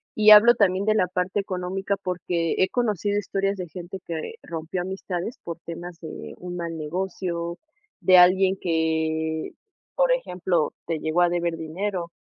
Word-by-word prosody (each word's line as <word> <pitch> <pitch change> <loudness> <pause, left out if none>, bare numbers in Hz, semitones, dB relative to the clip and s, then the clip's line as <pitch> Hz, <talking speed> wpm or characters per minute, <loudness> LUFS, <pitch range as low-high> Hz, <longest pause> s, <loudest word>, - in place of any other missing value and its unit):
Y 215 0 +5
hablo 215 +3 +9
también 195 -3 +2
de 215 - +4
la 185 - +3
parte 180 +2 -1
económica, 190 +1 -2
porque 175 -2 -1
he 190 - +3
conocido 205 -4 0
historias 195 0 -1
de 180 -1 -5
gente 180 +3 -8
que 165 - -5
rompió 165 +2 -4
amistades 190 +3 -4
por 170 - -5
temas 170 0 -7
de 160 -2 -8
un 180 0 -7
mal 170 -1 -4
negocio, 170 +1 -3 0.4
de 185 -1 +6
alguien 185 +2 +6
que, 160 -1 -1 0.4
por - - +3
ejemplo, 180 - 0 0.2
te 165 -2 -1
llegó 160 +3 +1
a 175 - +5
deber 170 -1 -1
dinero. 170 +2 -4
180 Hz, 155 wpm, -24 LUFS, 170-195 Hz, 0.4 s, hablo